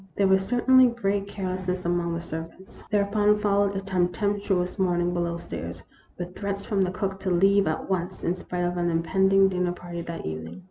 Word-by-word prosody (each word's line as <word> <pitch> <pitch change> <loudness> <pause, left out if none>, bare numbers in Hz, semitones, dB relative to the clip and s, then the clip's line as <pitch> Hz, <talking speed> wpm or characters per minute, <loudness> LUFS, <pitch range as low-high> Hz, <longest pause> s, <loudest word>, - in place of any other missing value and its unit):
There 200 - +4
was 190 0 +4
certainly 255 +4 +5
great 200 -4 -1
carelessness 185 -2 -3
among 170 -1 0
the 170 - -3
servants. 165 +3 -8
Thereupon 210 0 +3
followed 200 -1 +1
a 195 - -2
tem 185 -2 +1
pestuous 200 -1 -1
morning 175 -1 +1
below 170 -1 -1
stairs, 85 - -7 0.3
with 180 0 -6
threats 200 -1 -4
from 200 -3 0
the 185 - +2
cook 190 +1 -3
to 195 - -2
leave 195 +2 +4
at 155 - -2
once, 185 -1 -2
in 170 - +1
spite 180 -1 -4
of 175 0 -1
an 175 0 +1
impending 190 +4 +3
dinner 180 -2 0
party 175 -1 -7
that 170 0 -6
evening. 80 - -6
185 Hz, 190 wpm, -26 LUFS, 175-200 Hz, 0.3 s, certainly